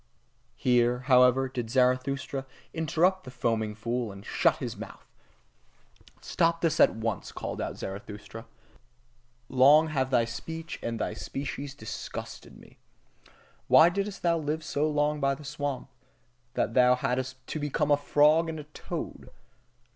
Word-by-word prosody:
Here, 125 0 +2
however, 130 0 +5
did 125 -3 -5
Zarathustra 130 +2 0 0.3
interrupt 170 +4 +1
the 130 - -9
foaming 115 -4 -1
fool, 115 +1 -3
and 100 +1 -12
shut - - +2
his - - -5
mouth. - - -10 1.2
Stop 165 -1 +1
this 165 -1 +1
at - - +5
once! 110 -2 -3
called - - -5
out - - -4
Zarathustra, 105 +3 -8 1.0
long 145 +5 +5
have 135 -4 0
thy 120 -3 +3
speech 160 +8 -7
and 115 -1 -3
thy - - -2
species 135 +5 -5
disgusted 110 -5 -8
me! - - -18 0.9
Why 165 - +7
didst 200 +2 -4
thou 170 -1 +2
live 155 +1 -2
so 155 0 0
long 150 0 +1
by 140 -1 +1
the 150 - -12
swamp, 145 -1 -4 0.7
that 115 - 0
thou 125 0 +5
thyself 125 - -11 0.2
hadst 130 -1 -5
to 155 - -3
become 150 0 0
a - - +7
frog 150 +3 +3
and 160 -1 -5
a - - -7
toad? 150 +1 -7
135 Hz, 145 wpm, -28 LUFS, 125-155 Hz, 1.2 s, Why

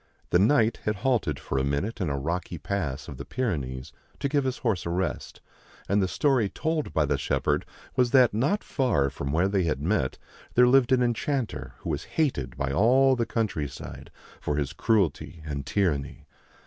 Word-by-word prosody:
The 90 - +5
Knight 115 +1 +4
had 105 - +1
halted 105 - +1
for 65 - -2
a - - 0
minute 80 - -2
in 90 - 0
a 70 - -1
rocky 85 +4 -3
pass 75 -4 -3
of 70 - -8
the 70 - -6
Pyrenees 70 - -3 0.3
to 140 - 0
give 140 -1 +1
his 130 -1 -1
horse 105 -10 -1
a - - -1
rest, 90 +1 -3 0.5
and 100 +1 +2
the 95 - +2
story 125 -1 +2
told 160 - -2
by 80 - +2
the 70 0 0
shepherd - - 0 0.3
was 125 -1 +3
that 125 -3 +5
not 140 - +1
far 95 - +1
from 70 +1 -4
where 85 +5 +2
they 100 -2 +1
had 75 -4 0
met 80 -7 0 0.4
there 125 - +7
lived 130 -1 +4
an 125 -1 +4
enchanter 120 +1 -2
who - - -3
was - - -3
hated 130 - 0
by 70 0 -1
all 130 - +4
the 120 -2 -1
countryside 100 -11 -3 0.3
for 75 - -1
his 75 0 -2
cruelty 90 -4 0
and 70 -2 -4
tyranny. 75 -9 -1
95 Hz, 185 wpm, -27 LUFS, -, 0.5 s, there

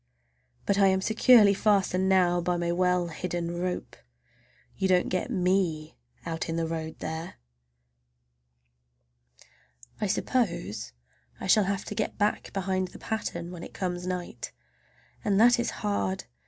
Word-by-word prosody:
But 200 - +1
I 195 - +6
am 190 0 +3
securely 220 +1 +6
fastened 190 -2 +2
now 175 -2 +3
by 175 0 0
my 170 0 -1
well 180 0 +1
hidden 175 0 -3
rope—you - - -6
don't 180 -1 +3
get 185 +6 -1
me 180 -6 0 0.3
out 165 0 -3
in 165 - -1
the 165 0 0
road 160 -1 -4
there! 160 +2 -5 2.7
I 210 - +1
suppose 170 - -1 0.5
I - - -6
shall 205 +2 +4
have 195 0 -2
to - - -5
get 210 0 -2
back 210 0 0
behind 190 -1 -1
the - - -12
pattern 175 -6 -4
when 175 -2 -8
it - - -10
comes 180 -1 -3
night, 180 -1 -5 0.7
and 200 -1 +2
that 240 +2 +6
is 240 - 0
hard! 100 -2 -2
180 Hz, 140 wpm, -28 LUFS, 170-195 Hz, 2.7 s, I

